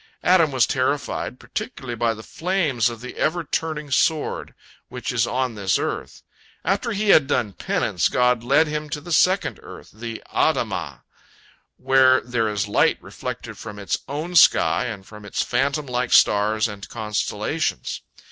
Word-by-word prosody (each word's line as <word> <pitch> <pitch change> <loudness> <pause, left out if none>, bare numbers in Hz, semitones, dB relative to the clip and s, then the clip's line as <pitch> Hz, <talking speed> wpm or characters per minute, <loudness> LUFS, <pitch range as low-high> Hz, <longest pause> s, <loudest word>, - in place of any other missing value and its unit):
Adam 170 -4 +4
was 130 -3 +3
terrified, 130 -1 -2
particularly 210 - -6
by 115 0 +1
the 110 -1 -7
flames 160 - 0
of 115 -1 -9
the 125 - -9
ever 170 +2 0
turning 150 -1 -3
sword, 155 +3 0 0.3
which 125 -1 -4
is 120 -1 +2
on 130 -1 -1
this 100 -3 0
earth. - - -4 0.4
After 200 +5 0
he 210 0 -1
had 150 -7 +6
done 105 -8 0
penance, - - 0
God 125 -1 +2
led 140 +6 +4
him 150 0 -4
to 150 - -3
the 175 +4 -10
second 160 - +2
earth, - - -12
the 115 +1 -7
Adamah, - - 0 0.7
where 130 -1 +5
there 120 -3 -1
is 105 0 -2
light 100 - +3
reflected - - -7
from 105 -2 -8
its 100 -3 -2
own 155 +5 -4
sky 145 - +5
and 105 -5 -6
from 105 0 -12
its 100 - -2
phantom 140 +4 0
like 125 -1 -2
stars 110 +2 +4
and 100 -2 -9
constellations. 110 -4 -2
125 Hz, 155 wpm, -23 LUFS, 110-150 Hz, 0.7 s, had